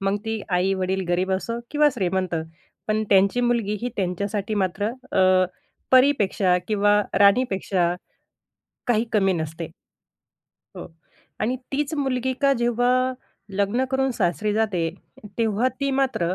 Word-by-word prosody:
मग 195 +1 0
ती 220 -1 -2
आई-वडील 190 +1 0
गरीब 180 +2 +1
असो 230 +5 -2
किंवा 300 0 +4
श्रीमंत, 185 -4 -1 0.5
पण 215 0 +1
त्यांची 200 +4 +4
मुलगी 235 -4 0
ही 245 - -2
त्यांच्यासाठी 200 +3 -2
मात्र 205 +4 -2 0.3
अ, 185 -1 +4 0.5
परीपेक्षा 215 -9 +4
किंवा 205 -1 +3 0.2
राणीपेक्षा, 195 -4 +3 0.9
काही 230 -1 +3
कमी 195 -3 +3
नसते. 160 -1 -4 1.1
हो. - - -7 0.5
आणि 240 +4 0 0.2
तीच 285 +2 -1
मुलगी 260 -3 -1
का 275 0 +5
जेव्हा 240 +1 +1 0.7
लग्न 215 +6 +1
करून 265 0 +1
सासरी 205 +2 0
जाते, 200 -6 0 0.5
तेव्हा 225 +2 +2
ती 275 0 0
मात्र 185 -10 0
205 Hz, 120 wpm, -23 LUFS, 190-240 Hz, 1.1 s, का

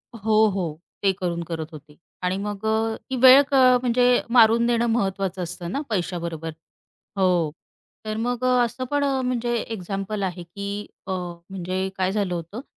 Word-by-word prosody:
हो, 220 0 +3
हो. 170 -5 -3 0.2
ते 195 - +4
करून 170 -2 -2
करत 160 -2 -4
होते 150 -1 -13 0.3
आणि 185 +1 0
मग 205 +1 -5
अ, 220 0 +1
ती 260 - -2
वेळ 260 +2 +9
क - - -4 0.3
म्हणजे 245 0 +2 0.3
मारून 230 0 +6
नेणं 235 0 +2
महत्त्वाचं 195 -4 -1
असतं 175 +1 -6
ना, 280 - -2
पैशाबरोबर. 170 -4 -3 0.7
हो, 180 -5 +2 0.5
तर 215 0 -3
मग 245 +2 -2
अ, - - +3 0.2
असं 240 +2 -5
पण 290 0 +1
अ, 270 -2 +1
म्हणजे 245 -1 -1 0.2
एक्झाम्पल 195 +1 -4
आहे 180 -1 -3
की 200 +4 -6 0.2
अ, 190 - -3 0.4
म्हणजे 185 0 -3
काय 185 0 +1
झालं 200 -3 -1
होतं? 175 +8 -5
200 Hz, 165 wpm, -24 LUFS, 180-230 Hz, 0.7 s, वेळ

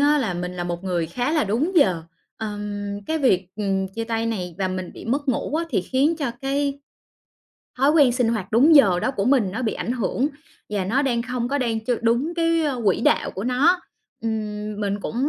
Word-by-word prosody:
á 295 +1 +4
là 215 -9 -1
mình 180 +1 -4
là 175 - -3
một 175 +1 -4
người 175 -3 -1
khá 245 - -2
là 305 -3 +2
đúng 245 - 0
giờ. 185 - +4 0.3
Ờm, 205 -2 -4
cái 320 0 0
việc, 190 -10 +2
ừm, 195 -2 -1
chia 225 +4 -5
tay 225 0 -1
này 180 -7 -3
và 190 -1 0
mình 185 -1 -4
bị - - -10
mất 275 +5 -1
ngủ 260 +4 -1
á, 335 +1 +1
thì 200 - +1
khiến 275 - +1
cho 285 -6 -2
cái 280 +1 -1 1.0
thói 275 +3 +4
quen 290 -6 +5
sinh 245 -2 +1
hoạt 215 -3 -2
đúng 285 +8 +6
giờ 195 -11 +6
đó - - 0
của 200 -7 -2
mình 245 -7 +3
nó 225 - -3
bị 220 - 0
ảnh 240 - -2
hưởng, 255 +4 0 0.4
và 200 -3 -1
nó 255 +9 +1
đang 240 -4 0
không 250 -1 -3
có 285 +1 0
đang 230 -3 0
ch 250 - -3
đúng 245 +9 +1
cái, 330 -1 +2
ơ, 270 -5 -1
quỹ 195 - +3
đạo - - +2
của 195 - -5
nó. 290 +9 +3 0.4
Ừm, 215 -2 -3
mình 205 0 -1
cũng 230 - -5
230 Hz, 225 wpm, -23 LUFS, 200-275 Hz, 1.0 s, đúng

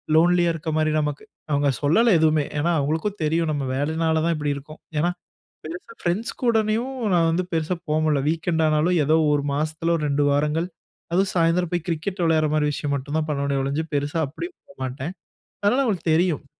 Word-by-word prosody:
லோன்லியா 175 +1 +4
இருக்ற 160 0 -4
மாரி 155 0 +2
நமக்கு 150 -1 -3 0.3
அவுங்க 145 0 +2
சொல்லல 215 +10 +4
எதுவுமே. 155 -2 +3
ஏன்னா 170 +4 +1
அவுங்களுக்கும் 160 +8 -1
தெரியும். 160 +1 +1
நம்ம 145 -2 -2
வேலைனால 160 +3 0
தான் 170 -1 +1
இப்படி 145 -1 -1
இருக்கோம். 150 +3 -10 0.2
ஏன்னா 175 +3 +2 0.5
பெருசா 180 +8 -8
பிரண்ட்ஸ் 180 +6 -1
கூடனையும் 230 +2 +1 0.2
நான் 165 -1 +4
வந்து 180 +3 0
பெருசா 165 +2 0
போகமுடியல. 155 -1 +2
வீக்கெண்ட் 165 0 0
ஆனாலும் 160 +3 +2
ஏதோ 155 +2 +3 0.2
1 145 -1 +2
மாசத்துல 155 +3 0
ஒரு 155 - -3
2 145 +1 +2
வாரங்கள் 150 +4 +1 0.4
அதுவும் 190 +2 +2
சாயந்தரம் 170 0 +2
போய் 175 0 -2
கிரிக்கெட் 175 +3 -2
விளையாடுற 160 -2 +3
மாரி 150 -1 +2
விஷயம் 145 0 -2
மட்டும் 145 +3 -4
தான் 155 - -2
பண்ணுவேனே, 140 -1 0
ஒழிஞ்சு 140 +4 -1
பெருசா 145 +3 -1
அப்பிடி 160 - -6 0.2
போமாட்டேன். 135 0 -5 0.5
அதனால 245 +7 +3
அவுங்களுக்கு 185 -9 0
தெரியும். 165 -3 +1
160 Hz, 175 wpm, -23 LUFS, 150-175 Hz, 0.5 s, லோன்லியா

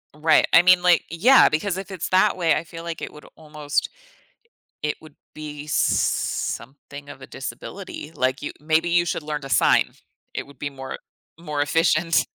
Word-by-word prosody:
Right, 155 +1 +4
I 165 - +8
mean, 180 0 +6
like 180 -1 +4
eh, - - -4
yeah, 260 +7 +7
because 180 +5 -1
if 195 0 -7
it's 185 -4 -4
that 185 0 +3
way, 170 -3 +2
I - - -2
feel 165 0 -10
like 170 -1 -6
it - - -6
would 150 - -14
almost 150 -2 -3 0.9
it 150 - -1
would 155 -2 -15 0.2
be 150 -1 -8
something 140 0 -2
of - - -11
a - - -9
disability, 155 - -8
like, 130 +2 -1
you - - -4
maybe 160 +2 +1
you 170 0 +3
should 155 - -2
learn 150 -1 -4
to 135 - -7
sign. - - +3 0.4
It - - -4
would 140 - -17
be 145 - -3
more 135 -1 -8 0.4
e - - -17
more 150 -3 -2
efficient. 165 +1 +2
155 Hz, 190 wpm, -23 LUFS, 145-170 Hz, 0.9 s, I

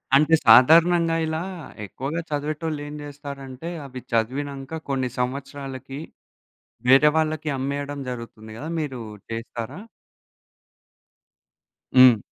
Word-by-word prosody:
అంటే 155 +3 +4
సాధారణంగా 165 +7 +7
ఇలా, 160 +1 -2 0.4
ఎక్కువుగా 140 - -4
చదివేటోళ్ళు 150 +1 -2
ఏం 145 - -7
జేస్తారంటే, 140 0 -8 0.2
అవి 130 -2 -8
చదివినంక 135 +6 -2
కొన్ని 130 -2 0
సంవత్సరాలకి, 135 +1 -4 0.9
వేరే 135 +4 +7
వాళ్ళకి 155 -1 0
అమ్మేయడం 140 +1 -3
జరుగుతుంది 115 -2 -8
గదా! 155 +5 -6
మీరు 135 -5 -4 0.3
చేసారా? 115 - -5 2.2
హ్మ్. 125 -3 +9
140 Hz, 95 wpm, -24 LUFS, 130-155 Hz, 2.2 s, హ్మ్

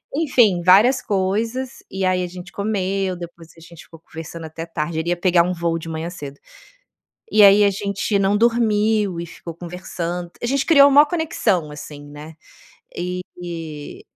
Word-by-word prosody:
enfim, 245 - +3
várias 205 +9 +5
coisas, 220 +6 -2
e 190 0 -3
aí 185 0 +1
a - - -3
gente 175 0 -10
comeu 195 -2 -2
depois 170 -1 -10
a - - -16
gente 170 0 -14
ficou 165 - -15
conversando 165 0 -9
até 160 +1 -7
tarde 160 0 -3
ele 165 +2 -2
ia 175 - 0
pegar 175 -1 +3
um 180 +1 -1
voo 170 -1 -1
de 165 - -9
manhã 160 +1 -4
cedo 145 -5 -9 0.9
e 215 - +6
aí 200 +1 +7
a - - +4
gente 200 +1 -2
não 195 +1 +2
dormiu 215 -4 +2
e 170 - -4
ficou 170 0 -9
conversando 175 0 -5
a - - -2
gente 275 +2 0
criou 285 -4 +7
maior 290 +2 +7
conexão 295 - -1
assim, 150 0 -10
né, 150 +2 -11 0.6
eh 175 -4 -6
180 Hz, 170 wpm, -21 LUFS, 165-205 Hz, 0.9 s, aí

